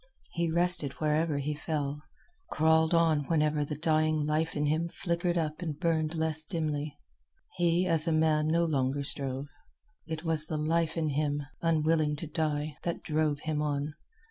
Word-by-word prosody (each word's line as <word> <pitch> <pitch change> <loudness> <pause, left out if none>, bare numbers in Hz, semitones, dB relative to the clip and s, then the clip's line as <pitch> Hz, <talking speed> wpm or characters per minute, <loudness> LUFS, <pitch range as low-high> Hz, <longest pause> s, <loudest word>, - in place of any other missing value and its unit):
He 170 -1 -1
rested 170 -4 +4
wherever 155 0 0
he 145 +2 -2
fell, 150 -1 -3 0.5
crawled 160 0 +3
on 165 -4 +3
whenever 150 -2 +1
the 145 0 -5
dying 155 -1 +1
life 155 +2 0
in 150 0 0
him 160 +3 0
flickered 175 0 -1
up 155 0 -2
and 155 -4 -4
burned 160 -2 0
less 160 -1 +1
dimly. 155 -3 -3 0.6
He, 175 +1 +2
as 165 -2 +2
a - - +2
man, 155 -1 +2
no 170 +2 +2
longer 140 -2 0
strove. 135 -1 -2 0.6
It 160 0 -5
was 160 -2 +1
the 155 - -2
life 160 +1 0
in 160 -2 0
him, 145 0 -1 0.2
unwilling 155 -2 +2
to 155 - -6
die, 150 -1 -2
that 170 - -3
drove 150 -2 0
him 155 -1 -2
on. 145 0 -2
155 Hz, 165 wpm, -29 LUFS, 150-165 Hz, 0.6 s, rested